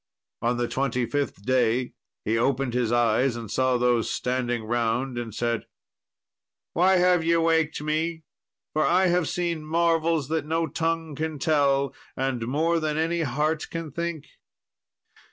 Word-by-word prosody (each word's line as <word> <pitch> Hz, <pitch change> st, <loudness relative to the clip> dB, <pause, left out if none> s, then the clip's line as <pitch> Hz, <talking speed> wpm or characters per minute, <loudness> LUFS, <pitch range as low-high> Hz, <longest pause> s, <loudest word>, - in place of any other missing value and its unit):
On 120 Hz, +1 st, +1 dB
the 120 Hz, 0 st, 0 dB
twenty 125 Hz, -2 st, -1 dB
fifth 140 Hz, -7 st, -3 dB
day 125 Hz, -1 st, +1 dB, 0.3 s
he 110 Hz, -, +1 dB
opened 130 Hz, +1 st, +1 dB
his 120 Hz, -2 st, 0 dB
eyes 120 Hz, +1 st, +2 dB
and 115 Hz, -4 st, -7 dB
saw 130 Hz, -1 st, +2 dB
those 120 Hz, -2 st, +2 dB
standing 125 Hz, -2 st, -1 dB
round, 120 Hz, +3 st, -1 dB
and 115 Hz, -2 st, -5 dB
said, 115 Hz, +2 st, -2 dB, 1.1 s
"Why 185 Hz, +2 st, +4 dB
have 180 Hz, -1 st, +4 dB
ye 170 Hz, +1 st, +3 dB
waked 160 Hz, -2 st, +2 dB
me? 160 Hz, +2 st, -1 dB, 0.5 s
for 155 Hz, -, +2 dB
I 185 Hz, +4 st, +3 dB
have 175 Hz, -1 st, +1 dB
seen 170 Hz, -3 st, -2 dB
marvels 165 Hz, -2 st, +1 dB
that 160 Hz, -1 st, 0 dB
no 165 Hz, +1 st, +1 dB
tongue 165 Hz, -1 st, -2 dB
can 155 Hz, +1 st, -3 dB
tell, 140 Hz, -2 st, +2 dB, 0.2 s
and 130 Hz, -3 st, -1 dB
more 160 Hz, +6 st, +1 dB
than 155 Hz, -1 st, -1 dB
any 165 Hz, +1 st, 0 dB
heart 150 Hz, +2 st, -1 dB
can 165 Hz, -2 st, -5 dB
think." 170 Hz, -1 st, -4 dB
145 Hz, 150 wpm, -25 LUFS, 120-165 Hz, 1.1 s, Why